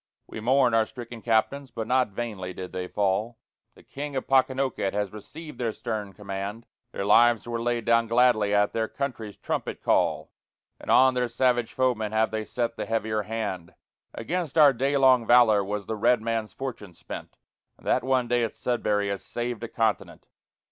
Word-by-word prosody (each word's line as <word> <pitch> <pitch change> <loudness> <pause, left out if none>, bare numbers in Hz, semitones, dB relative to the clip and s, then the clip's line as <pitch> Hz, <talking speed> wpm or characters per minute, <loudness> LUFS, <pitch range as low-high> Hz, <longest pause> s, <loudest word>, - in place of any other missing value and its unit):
We - - -8
mourn 125 +1 +3
our 110 -1 +3
stricken 120 -1 -9
Captains, 120 +5 0
but 115 -1 -5
not 125 +2 +2
vainly 100 -4 -5
did 90 0 -7
they 90 0 -4
fall: 105 +4 -1 0.4
The - - -18
King 145 0 -7
of 130 - -2
Pocanoket 130 -6 +1
has 105 -1 -2
received 150 +7 -10
their 115 -2 0
stern 105 -3 -5
command; 100 +2 -6 0.3
Their 100 - -4
lives 120 +2 +4
were 120 -1 -3
laid 120 -1 -1
down 115 0 +3
gladly 115 -3 +3
at 105 0 +2
their 110 -1 0
country's 115 -7 -5
trumpet - - -4
call, - - +1 0.5
And - - -11
on 130 0 +6
their 125 -1 0
savage 120 -1 +1
foemen 115 -5 0
have 110 0 +2
they 110 0 -3
set 120 0 -3
the - - -4
heavier 110 -1 -1
hand; 105 -5 -5 0.4
Against 170 -3 -3
our 145 -3 +7
day 135 +3 0
long 130 -4 +4
valor 115 -4 +5
was 100 0 -4
the 110 - -3
red 120 +3 +3
man's 115 -1 -2
fortune 115 -9 -7
spent - - -9 0.4
And - - -22
that 125 - +2
one 130 -1 +1
day 120 0 +1
at 115 - -3
Sudbury 105 -4 0
has 100 -1 -4
saved 120 -1 -4
a - - -3
continent. 110 -2 -2
115 Hz, 185 wpm, -26 LUFS, 105-125 Hz, 0.5 s, our